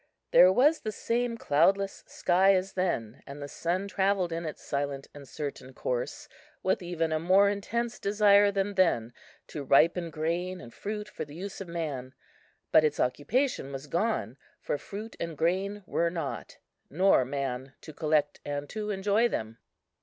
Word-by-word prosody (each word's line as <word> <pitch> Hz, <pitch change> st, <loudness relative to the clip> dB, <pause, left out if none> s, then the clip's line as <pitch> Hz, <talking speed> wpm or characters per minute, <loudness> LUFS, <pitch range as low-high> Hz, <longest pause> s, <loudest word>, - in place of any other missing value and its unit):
There 185 Hz, -, +8 dB
was 290 Hz, +10 st, +4 dB
the 215 Hz, -, -4 dB
same 235 Hz, +2 st, -1 dB
cloudless 195 Hz, +5 st, +2 dB
sky 190 Hz, +2 st, +3 dB
as 190 Hz, +1 st, -1 dB
then; 140 Hz, -, -2 dB
and 140 Hz, +1 st, -8 dB
the 145 Hz, -, -5 dB
sun 180 Hz, +6 st, -2 dB
travelled 190 Hz, -2 st, +1 dB
in 165 Hz, 0 st, -3 dB
its 155 Hz, -, -7 dB
silent 140 Hz, -1 st, -3 dB
and 145 Hz, -2 st, -11 dB
certain 135 Hz, -2 st, -6 dB
course, 125 Hz, -1 st, -3 dB, 0.4 s
with 190 Hz, -, +1 dB
even 170 Hz, -2 st, -2 dB
a 155 Hz, -, +1 dB
more 190 Hz, +5 st, +5 dB
intense 230 Hz, +4 st, -3 dB
desire 205 Hz, 0 st, +5 dB
than 200 Hz, +1 st, -1 dB
then 125 Hz, -, +2 dB, 0.4 s
to 150 Hz, -, -5 dB
ripen 170 Hz, +5 st, +4 dB
grain 170 Hz, +4 st, -2 dB
and 120 Hz, -, -11 dB
fruit 210 Hz, 0 st, -5 dB
for -, -, -6 dB
the 145 Hz, 0 st, -11 dB
use 195 Hz, +3 st, -6 dB
of 190 Hz, -, -6 dB
man; 145 Hz, -7 st, -4 dB, 0.6 s
but 155 Hz, -, +6 dB
its 150 Hz, -1 st, +1 dB
occupation 170 Hz, -, 0 dB
was 135 Hz, +1 st, -6 dB
gone, 165 Hz, -, -1 dB, 0.2 s
for 145 Hz, -, -2 dB
fruit 215 Hz, +3 st, -8 dB
and 165 Hz, -2 st, -4 dB
grain 195 Hz, +5 st, 0 dB
were 170 Hz, -1 st, +1 dB
not, 165 Hz, -4 st, -5 dB, 0.3 s
nor 180 Hz, -2 st, +4 dB
man 135 Hz, -1 st, -4 dB
to 155 Hz, -, -10 dB
collect 150 Hz, -1 st, +1 dB
and 145 Hz, 0 st, -4 dB
to 215 Hz, -1 st, -4 dB
enjoy 205 Hz, +3 st, +2 dB
them. 110 Hz, -, -4 dB
170 Hz, 165 wpm, -29 LUFS, 145-200 Hz, 0.6 s, There